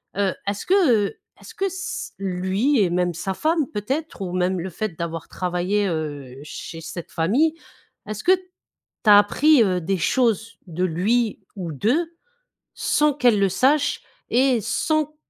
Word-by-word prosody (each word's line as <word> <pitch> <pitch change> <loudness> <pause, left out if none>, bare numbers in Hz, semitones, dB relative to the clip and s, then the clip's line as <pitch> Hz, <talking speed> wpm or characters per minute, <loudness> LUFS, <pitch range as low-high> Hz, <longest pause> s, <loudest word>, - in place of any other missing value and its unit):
Heu, 195 -1 +1
est-ce 200 0 -2
que, 375 -6 +4 0.2
heu, - - -10 0.2
est-ce - - -12
que 390 - -2
s 380 -1 -4
lui 195 +8 0
et 190 -4 +3
même 175 0 0
sa 175 +4 -3
femme, 315 - 0
peut-être, 265 +7 -3
ou 185 -2 -3
même 185 0 0
le 190 - -4
fait 185 -1 -4
d'avoir 165 -1 -5
travaillé, 185 +3 -1
heu, 145 -5 -4
chez 165 +2 -8
cette 165 +1 -8
famille, 260 - +2 0.5
est-ce 215 0 -5
que 365 - +4
tu 375 - +1 0.7
as 205 - +10
appris, 255 +7 +5
heu, 185 -3 +1
des 190 +4 -1
choses 225 +1 0
de 175 +1 -3
lui 205 +7 +1 0.2
ou 180 -5 -5
d'eux 265 - 0 0.6
sans 300 -1 +2
qu'elle 245 -6 +3
le 195 - +4
sache 285 +8 +2 0.3
et 255 -1 +3
sans 305 +8 -1
205 Hz, 160 wpm, -23 LUFS, 180-270 Hz, 0.7 s, as